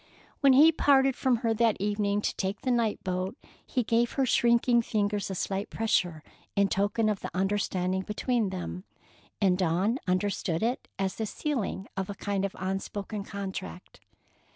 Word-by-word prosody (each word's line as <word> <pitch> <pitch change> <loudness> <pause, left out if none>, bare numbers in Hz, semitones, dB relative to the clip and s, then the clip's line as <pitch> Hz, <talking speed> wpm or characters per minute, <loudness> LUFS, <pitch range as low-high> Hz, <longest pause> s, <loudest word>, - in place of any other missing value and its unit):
When 275 -2 +6
he 300 +5 +8
parted 270 -4 +4
from 260 -2 +2
her 225 - +3
that 225 0 +2
evening 205 0 0
to - - -1
take 195 +1 -3
the 255 - 0
night 230 -3 0
boat, 185 0 -2 0.3
he 250 - -1
gave 230 +1 +1
her 270 - +1
shrinking 235 0 +3
fingers 205 -3 -1
a 190 - -3
slight 195 +3 -2
pressure 175 -8 0 0.3
in 200 0 +3
token 205 +3 +1
of 210 -2 0
the - - -5
understanding 190 -1 0
between 215 +2 -1
them, 185 0 -5 0.6
and 190 -3 +3
Dawn 190 +8 +1
understood 185 -1 0
it 240 +3 -1
as 190 -1 -2
the 220 - -2
sealing 230 -8 -3
of 195 -1 -3
a 200 - -4
kind 200 -1 -2
of 195 - -5
unspoken 195 +2 -4
contract. 190 -2 -7
205 Hz, 165 wpm, -28 LUFS, 190-230 Hz, 0.6 s, he